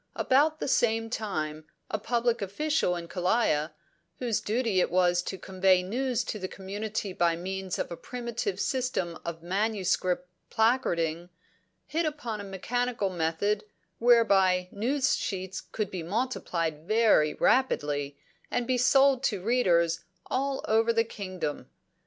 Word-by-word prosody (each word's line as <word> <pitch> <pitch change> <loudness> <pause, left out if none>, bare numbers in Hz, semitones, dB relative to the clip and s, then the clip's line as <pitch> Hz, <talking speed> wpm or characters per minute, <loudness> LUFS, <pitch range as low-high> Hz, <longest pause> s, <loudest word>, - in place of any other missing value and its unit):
About 305 +4 +3
the - - -2
same 225 -3 +1
time, 155 -9 -3 0.3
a 215 - -1
public 235 +1 0
official 200 - 0
in 170 -1 -6
Kalaya, 180 -4 +1 0.5
whose 235 -4 -1
duty 220 -3 0
it - - +1
was 175 0 +3
to 190 - -5
convey 185 0 +2
news 245 +4 -1
to 215 - -5
the 185 - -3
community 205 +1 -4
by 170 -2 +2
means 190 +1 -4
of - - -3
a - - -3
primitive 235 -3 -4
system 250 - -1
of 165 -1 -6
manuscript 185 -2 0 0.2
placarding, 175 -8 +1 0.6
hit 325 +1 0
upon 240 -9 -4
a - - -7
mechanical 210 +2 -2
method 175 +5 0 0.4
whereby 195 -6 +4
news 265 +7 +1
sheets 190 -1 -4
could 215 -3 -2
be 185 - -4
multiplied 170 -6 -2
very 215 -9 +4
rapidly 145 - +1 0.3
and 245 - -1
be 255 0 +1
sold 270 +1 +5
to 205 -5 0
readers 175 -7 +2 0.3
all 270 +1 -1
over 225 +1 +3
the 230 0 +3
kingdom. 185 -8 -5
200 Hz, 135 wpm, -28 LUFS, 180-240 Hz, 0.6 s, sold